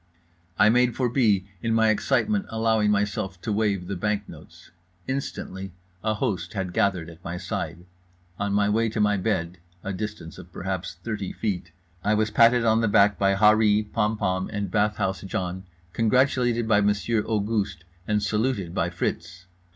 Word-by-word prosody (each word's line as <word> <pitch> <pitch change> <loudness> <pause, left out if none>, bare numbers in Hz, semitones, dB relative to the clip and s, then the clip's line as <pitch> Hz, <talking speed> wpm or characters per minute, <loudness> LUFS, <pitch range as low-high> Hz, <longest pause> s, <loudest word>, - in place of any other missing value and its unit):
I 105 - +6
made 125 +1 +3
for 125 -2 +1
B., 110 -7 +2 0.2
in 115 -1 0
my 110 0 +4
excitement 140 - +1
allowing 110 -1 +1
myself 100 -2 -1
to 110 - -2
wave 100 -4 0
the 100 - -4
bank 105 +2 -1
notes. - - -14 0.4
Instantly 95 -8 -4 0.3
a 110 0 +1
host 90 -3 -2
had 95 -3 -3
gathered 90 -5 +1
at 85 +1 -13
my 85 +1 -4
side. 85 0 -5 0.5
On 100 0 -1
my 100 0 +2
way 110 +2 +2
to 110 - -4
my 105 -1 +3
bed—a 90 -1 -3
distance 105 -4 -6
of 90 -1 -12
perhaps 95 0 -4
thirty 105 -4 -3
feet—I 90 -1 -3
was 110 0 +1
patted 115 0 +5
on 110 0 +3
the 115 - +2
back 100 -1 +4
by 100 0 +3
Harree, 105 +1 +4
Pompom 105 -4 0
and 100 -3 -3
Bathhouse 105 -3 0
John, 95 -1 -4 0.3
congratulated 120 0 +2
by 105 -2 +4
Monsieur 105 +2 +1
Auguste, 105 -3 -1 0.2
and 105 -1 +1
saluted 105 -4 -1
by 90 -3 0
Fritz. 85 0 -4
105 Hz, 160 wpm, -25 LUFS, 95-110 Hz, 0.5 s, I